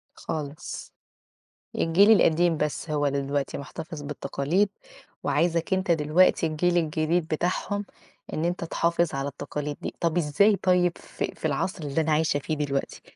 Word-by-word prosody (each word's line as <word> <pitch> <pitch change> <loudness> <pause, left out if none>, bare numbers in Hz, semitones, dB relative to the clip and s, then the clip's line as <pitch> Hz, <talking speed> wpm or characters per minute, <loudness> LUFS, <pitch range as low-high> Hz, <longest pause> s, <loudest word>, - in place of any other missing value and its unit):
خالص. 150 -1 -6 0.9
الجيل 195 +7 +5
القديم 170 -4 +4
بس 150 +2 -2
هو 145 -1 0
اللي 140 0 +1
دلوقتي 140 0 -2
مُحتفِظ 150 +2 -7
بالتقاليد، 145 +6 0 0.5
وعايزك 165 +5 +1
أنت 190 -1 +1
دلوقتي 165 +2 +3
الجيل 175 +3 +1
الجديد 160 +1 +1
بتاعهم 185 +5 -1 0.5
إن 160 - -1
أنت 175 0 -1
تحافظ 170 0 0
على 135 +1 -2
التقاليد 145 +1 -5
دي، - - -4
طَب 170 0 0
إزاي 175 +6 +4
طيب 180 -2 +2
في - - -5
في - - -7
العصر 160 +4 -1
اللي 145 +2 0
أنا 155 0 0
عايشة 155 -1 +2
فيه 155 - -3
دلوقتي، 140 -2 -2
160 Hz, 145 wpm, -26 LUFS, 145-175 Hz, 0.9 s, الجيل